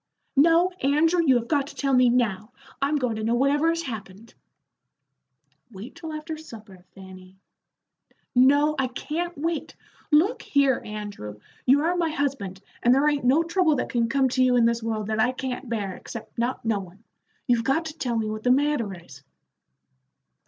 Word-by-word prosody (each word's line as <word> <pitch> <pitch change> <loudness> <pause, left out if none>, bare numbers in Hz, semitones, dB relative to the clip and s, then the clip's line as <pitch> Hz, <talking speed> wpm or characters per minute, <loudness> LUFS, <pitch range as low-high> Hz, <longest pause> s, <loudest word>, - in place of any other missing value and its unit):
"No, 335 +5 +4
Andrew, 320 +5 +3
you 270 -5 +4
have 235 -1 0
got 285 -3 +1
to - - -11
tell 275 -1 -1
me 250 -1 +5
now. 235 -3 0 0.3
I'm 280 +2 +1
goin' 250 -6 -1
to 220 - -4
know 230 +2 +1
whatever 285 +5 +2
has 335 0 -1
happened." 220 - -8 1.4
"Wait 205 +4 -10
till 325 -1 -8
after 310 +1 -6
supper, 215 - -13
Fanny." 190 -1 -13 1.0
"No, 285 +4 +4
I 265 - +1
can't 325 +7 -4
wait. 325 +1 -3 0.3
Look 345 +11 +3
here, 275 -3 +2
Andrew, 205 - -7 0.3
you 275 +3 +5
are 345 +2 +1
my 340 -2 0
husband, 265 -11 -3 0.2
and 245 +1 +4
there 280 +2 +3
ain't 290 -3 0
no 280 +7 +4
trouble 335 -2 +2
that 250 - -2
can 235 -1 0
come 270 +1 +2
to 255 +1 +2
you 250 -1 +3
in 240 -1 +4
this 235 0 +1
world 220 -2 -3
that 215 +1 -2
I 245 +3 +2
can't 255 -1 -5
bear, 205 -5 -2
except 230 - -10
not 240 +1 -2
knowin'. 200 -2 -3 0.4
You've 240 -2 +2
got 270 +7 +1
to 315 - -6
tell 245 -6 -1
me 220 -1 -1
what 215 0 -4
the 250 - 0
matter 270 -5 +2
is." 140 -6 -15
255 Hz, 180 wpm, -25 LUFS, 220-300 Hz, 1.4 s, me